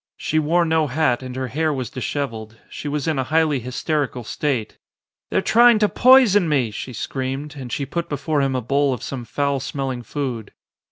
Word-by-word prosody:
She 155 - 0
wore 170 +3 +2
no 160 -1 +2
hat 135 -3 +1
and 130 -1 -7
her 130 -1 -3
hair 155 +5 0
was 130 -5 -4
dishevelled. 115 -4 -4
She - - -6
was 145 0 -2
in 155 -4 0
a - - +1
highly 155 +1 +2
hysterical 130 +1 -2
state. 125 -1 -2 0.5
"They're - - +1
trying 240 0 +6
to 210 -1 +3
poison 225 -8 +5
me," 130 -7 +1
she 115 +5 -6
screamed 135 +4 -4
and 130 -4 -8
she 140 - -2
put 170 +4 -4
before 145 +1 -1
him 135 -1 0
a 130 - 0
bowl 140 +2 +1
of 115 - -11
some 125 -3 -5
foul 140 +3 -1
smell 135 0 -3
ing 125 -1 -5
food. 120 -3 -5
140 Hz, 200 wpm, -21 LUFS, 125-155 Hz, 0.5 s, trying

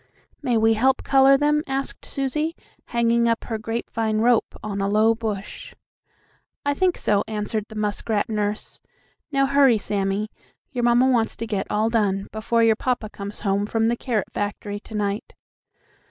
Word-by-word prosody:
"May 250 -5 +1
we 225 0 +4
help 260 +4 +2
color 270 0 +5
them?" 295 +1 +2
asked 270 0 -3
Susie, 300 +4 -2 0.3
hanging 235 0 +2
up 230 - 0
her 225 -2 -4
grapevine 225 0 -2
rope 235 +1 +2
on 200 -2 -3
a 195 - 0
low 215 +2 +4
bush. 215 -3 -5 0.9
"I 285 - +2
think 365 +4 +1
so," 205 -1 +1
answered 215 0 -3
the 220 - -10
muskrat 210 0 -1
nurse. 210 -1 -3 0.5
"Now, 275 -1 +3
hurry, 275 -4 +5
Sammie; 200 0 -1 0.4
your 245 -3 -2
mamma 240 +2 +4
wants 235 -4 +2
to 230 - -4
get 205 -3 -2
all 220 +2 +1
done 200 -4 +1
before 230 +1 +1
your 225 -1 +5
papa 235 -2 -2
comes 200 +1 -7
home 200 +1 0
from 225 +1 +1
the 235 - +1
carrot 235 -4 -2
factory 205 0 -3
to 220 - -11
night." 205 0 -2
225 Hz, 165 wpm, -23 LUFS, 210-245 Hz, 0.9 s, color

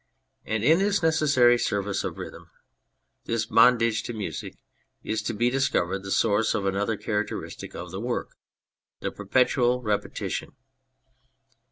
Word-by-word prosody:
And 110 -1 -1
in 160 +7 +5
this 200 -2 +1
necessary 140 -7 +4
service 100 -2 -1
of - - -4
rhythm, - - -9 0.8
this 115 -1 -1
bondage 115 0 +4
to 120 - -6
music, 100 -8 -5 0.5
is 110 0 -2
to 105 - -3
be 120 +3 +2
discovered 100 -8 0
the 100 - -8
source 105 +2 +2
of 100 - -1
another 100 +3 0
characteristic 105 0 -4
in 90 - -6
the 95 +2 -5
work: 120 +1 -2 0.7
the - - -2
perpetual 125 +3 +1
repetition. 105 -2 -3
115 Hz, 135 wpm, -26 LUFS, 105-125 Hz, 0.8 s, in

